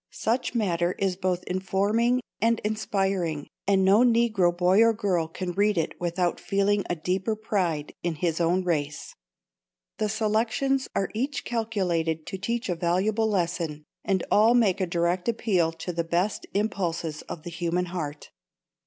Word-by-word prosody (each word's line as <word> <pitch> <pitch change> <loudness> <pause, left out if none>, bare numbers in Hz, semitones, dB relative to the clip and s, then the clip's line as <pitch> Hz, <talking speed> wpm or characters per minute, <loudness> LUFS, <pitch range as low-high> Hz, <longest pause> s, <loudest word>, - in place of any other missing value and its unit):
Such 245 +2 -1
matter 175 -5 +1
is 195 -2 -1
both 180 -1 -1
informing 205 +7 +1 0.2
and 230 0 +3
inspiring, 195 -7 -1 0.2
and 195 -1 +3
no 195 +3 +6
Negro 230 -7 +4
boy 180 +4 +3
or 230 0 +5
girl 185 -6 0
can 180 +2 -4
read 205 +2 +2
it 160 - 0
without 175 0 0
feeling 200 0 +1
a 175 - 0
deeper 185 +6 -1
pride 180 -9 -1
in 170 -2 -2
his 165 +1 -1
own 175 +3 +2
race. 150 -4 -2 0.9
The 215 -1 0
selections 225 +5 0
are 195 - 0
each 250 +3 -2
calculated 180 -9 -1
to 190 - -6
teach 235 +5 -2
a 180 - 0
valuable 185 +6 +1
lesson, 170 -5 -2 0.2
and 190 -3 0
all 220 +3 +5
make 205 -6 +3
a 185 - +1
direct 175 +4 0
appeal 190 -8 +1
to 165 +2 -5
the 170 0 -1
best 175 +5 -1
impulses 170 -7 -1
of 155 - -6
the 175 - -7
human 170 +1 -1
heart. 155 -5 -6
185 Hz, 155 wpm, -26 LUFS, 170-215 Hz, 0.9 s, no